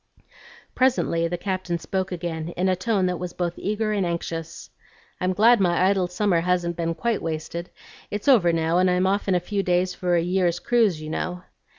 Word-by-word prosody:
Presently 245 -10 +2
the 175 +1 -3
Captain 185 -2 -2
spoke 190 +2 -3
again 165 -2 -4
in 185 +2 +1
a 185 - +2
tone 190 0 0
that 180 -2 -1
was 180 0 -5
both 175 -1 -2
eager 215 +2 -1
and 205 -2 0
anxious, 165 - -5 0.5
"I'm 185 0 0
glad 225 +5 +5
my 175 -3 +2
idle 190 -2 +1
summer 180 -1 +1
hasn't 175 -1 0
been 165 0 -2
quite 230 +5 -1
wasted. 165 +2 -4 0.4
It's 205 +6 -5
over 215 -11 +5
now, 165 +1 +1
and 185 0 +3
I'm 180 +1 +2
off 200 +2 0
in 190 - +2
a - - +3
few 200 +3 -2
days 180 0 +1
for 180 -1 0
a 170 - +3
year's 175 -1 +1
cruise, 215 -5 +2
you 155 - -6
know." 180 +2 -3
180 Hz, 200 wpm, -24 LUFS, 170-195 Hz, 0.5 s, glad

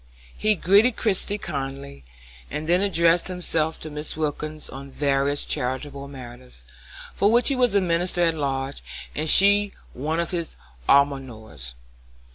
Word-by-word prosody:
He 215 0 +2
greeted 205 +7 +4
Christie 205 -1 0
kindly, 135 - -6 0.5
and 155 +1 -4
then 175 +2 +3
addressed 170 -3 +3
himself 165 -3 -1
to 155 - -7
Mrs. 150 +1 -6
Wilkins 155 0 -3
on 135 +1 -9
various 140 +1 0
charitable 140 +2 -3
matters, 125 - -11 0.5
for 210 +5 +4
he 275 +3 +1
was 245 -5 +2
a 200 - +5
minister 175 0 0
at 165 -1 +3
large, 135 -2 -3 0.3
and 155 +1 -1
she 205 +2 +5 0.2
one 155 +6 -2
of 170 - -1
his 170 -3 -3 0.3
almoners. 125 - 0
155 Hz, 135 wpm, -24 LUFS, 135-180 Hz, 0.5 s, a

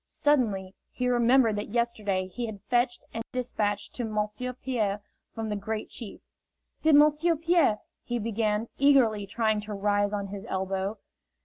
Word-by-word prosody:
Suddenly 210 -10 +1 0.2
he 250 - -2
remembered 240 -1 +4
that 205 - -4
yesterday 210 -5 0
he 235 +6 -5
had 205 -3 -8
fetched 245 +2 0
a 225 - -3
despatch 220 -5 -2
to 245 - -4
Monsieur 215 +3 -2
Pierre 230 -6 -2 0.4
from 225 -1 -3
the 210 - -2
Great 215 +2 -4
Chief 230 -5 -7 0.6
"Did 315 -2 +5
M'sieu' 300 +3 +5
Pierre 330 -8 +3
" - - -57
he 240 - -2
began, 220 0 -1
eagerly, 245 -8 +4
trying 220 0 +1
to 210 0 -5
rise 205 0 +1
on 205 -1 -2
his 200 0 -6
elbow. 190 +2 -2
220 Hz, 155 wpm, -28 LUFS, 205-250 Hz, 0.6 s, Did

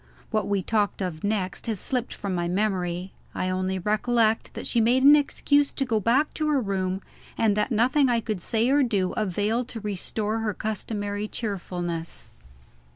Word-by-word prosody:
What 215 -3 0
we 200 -2 0
talked 210 -1 0
of 165 -4 -4
next 200 -3 -2
has 220 -4 -1
slipped 250 +2 0
from 200 -2 -4
my 175 -1 -1
memory. 185 -1 -1 0.2
I 185 - -1
only 185 +1 -1
recollect 220 +3 +1
that - - -5
she 235 - +2
made 245 +4 +3
an 290 +2 +9
excuse 290 0 +2
to 270 - -1
go 225 -4 +1
back 250 +8 +2
to 310 - -1
her 295 -2 +3
room, 190 -3 -2 0.3
and 215 -3 +3
that 210 +4 +1
nothing 255 +4 +3
I 235 -1 +3
could 215 -5 -3
say 225 +5 +1
or 285 +1 +4
do 200 -8 +1
availed 215 +3 0
to 235 - -6
restore 210 +1 -2
her 215 -3 -2
customary 205 -1 -3
cheerfulness. 175 -6 -4
215 Hz, 175 wpm, -26 LUFS, 190-235 Hz, 0.3 s, an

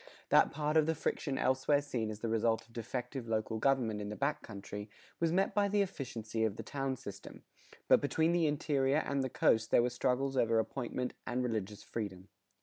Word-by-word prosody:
That - - +6
part 150 +1 0
of 155 -1 +4
the 160 - +1
friction 140 -2 -2
elsewhere 130 +2 +3
seen 125 -6 -3
as 105 0 -7
the 115 - -1
result 115 0 +1
of 115 - -23
defective 125 +2 -4
local 110 0 -1
government 115 -5 +1
in 105 - -4
the 105 - -4
back 140 +4 -1
country, 105 0 -7 0.3
was 165 -1 +2
met 190 +3 +2
by 205 -1 +3
the 205 0 +3
efficiency 115 - -4
of 110 -3 +1
the - - -6
town 135 -1 -2
system; 100 -5 -10 0.4
but - - +6
between 160 +3 +2
the 170 -2 +3
interior 145 -1 +1
and 140 -1 0
the 130 - -2
coast 110 -1 +2
there 120 - +5
were 125 - 0
struggles 130 +2 0
over 115 -3 +3
apportionment 125 +2 -2
and 125 +1 0
religious 105 -4 -3
freedom. 100 -4 -5
125 Hz, 200 wpm, -33 LUFS, 110-140 Hz, 0.4 s, That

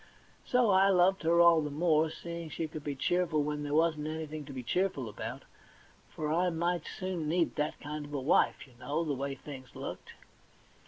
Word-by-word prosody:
So 245 -4 +3
I 190 +1 +5
loved 190 0 +4
her 170 +1 +3
all 170 -2 +7
the 150 - -3
more, 155 +1 +2
seeing 170 0 -7
she 160 +1 -3
could 155 -1 -8
be 145 -2 -3
so 135 - -16
cheerful 170 -4 +2
when 150 0 -2
there 145 0 -2
wasn't 155 -2 +2
anything 155 -1 -5
to 140 - -9
be 130 -2 -6
cheerful 160 -2 0
about; 105 - -6 0.7
for 155 0 -2
I 180 +2 +2
might 170 0 -1
soon 180 -5 -3
need 170 0 +1
that 150 +1 -1
kind 150 0 -5
of 145 - -11
wife, 145 +3 +2
you 130 - -20
know, 145 +5 -1
the 150 -3 -1
way 140 +1 -3
things 130 -1 -10
looked. - - -7
155 Hz, 200 wpm, -31 LUFS, 145-170 Hz, 0.7 s, all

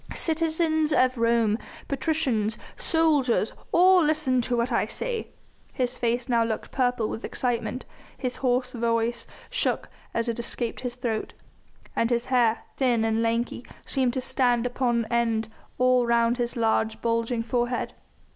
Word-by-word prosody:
Citizens 320 -1 +1
of 255 -3 +3
Rome, 230 -2 +2 0.3
patricians, 260 -7 0 0.2
soldiers, 295 - +2 0.2
all 365 0 +6
listen 300 -5 +2
to 240 0 -1
what 235 +2 0
I 230 - +1
say." - - -3 0.5
His 250 -1 -1
face 240 0 -1
now 235 -2 +3
looked 225 -1 -3
purple 245 -4 +1
with 225 - -5
excitement, 245 -1 -2 0.3
his 255 -2 -3
hoarse 250 -1 0
voice 230 0 -1 0.2
shook - - 0 0.2
as 230 +1 -1
it 235 0 -2
escaped 235 0 -2
his 250 -1 -4
throat, 235 -4 -3 0.6
and 230 - +1
his 235 -1 0
hair, 230 -3 +3
thin 240 -4 +2
and 225 0 +1
lanky, 230 +1 -1 0.2
seemed 260 -3 +1
to 260 - -1
stand 245 -2 +1
upon 240 -2 0
end 230 -2 +1 0.3
all 255 -1 +3
round 235 0 +3
his 240 0 -2
large, 220 -1 +1
bulging 230 0 0
forehead. 240 +1 -1
240 Hz, 145 wpm, -26 LUFS, 230-255 Hz, 0.6 s, all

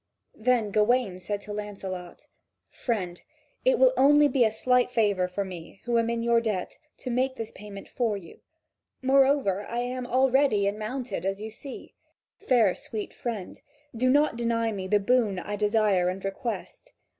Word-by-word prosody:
Then 230 -2 +2
Gawain 215 -2 +2
said 200 +3 -4
to 210 0 -7
Lancelot: 195 -4 -7 0.5
"Friend, 185 -8 -3 0.4
it - - +4
will - - +6
be - - -10
only 285 -2 +5
a 220 - +4
slight 250 +3 +2
favour 205 -6 +1
for 195 +2 -3
me, 180 0 -10
who 235 -1 +1
am 230 0 0
in 235 0 -1
your 235 0 +3
debt, 210 -6 -3 0.2
to 255 - -4
make 260 +2 0
this 225 -3 -6
payment 200 -1 -10
for 230 -5 -1
you. 170 -4 -13 0.6
Moreover, 265 -7 +3
I 235 - -4
am 245 +1 -3
all 260 +1 +3
ready 260 -7 +3
and 200 +2 -1
mounted, 250 +2 -4
as 195 +1 -2
you 220 +1 -6
see. 270 +5 -10 0.5
Fair, 230 -7 +3
sweet 215 -2 -6
friend, 220 -6 -6 0.3
do 255 +3 +2
not 290 -2 +3
deny 230 -1 0
me 190 -3 -4
the 205 +2 +3
boon 215 -2 +2
I 205 +4 -4
desire 205 -3 +2
and 190 +1 -5
request." 235 - -5
225 Hz, 170 wpm, -27 LUFS, 200-250 Hz, 0.6 s, will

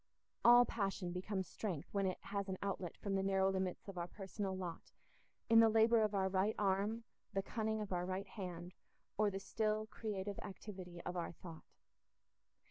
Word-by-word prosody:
All 240 +1 +9
passion 195 -5 -2
becomes 190 +1 -2
strength 180 -9 -4
when 200 -1 +2
it 185 - -1
has 200 -1 -3
an 190 - -2
outlet 190 -3 -3
from 200 -2 -3
the 195 - +2
narrow 195 0 +3
limits 190 0 -2
of 195 -3 -5
our 170 - -2
personal 195 0 -4
lot 180 -3 -6 0.6
in 230 -1 +7
the 225 -1 +8
labour 225 +1 +5
of 215 -1 +1
our 190 -1 +2
right 190 +3 +1
arm, 205 +3 +1 0.3
the 195 - 0
cunning 220 0 -1
of 210 -3 -3
our 175 0 0
right 190 +1 -2
hand, 180 -3 -6 0.4
or 210 0 +3
the 195 -1 -4
still, 215 +1 0
creative 205 -3 -4
activity 185 -3 -8
of 180 - -4
our 170 -1 -2
thought. 165 -1 -10
195 Hz, 180 wpm, -38 LUFS, 185-215 Hz, 0.6 s, All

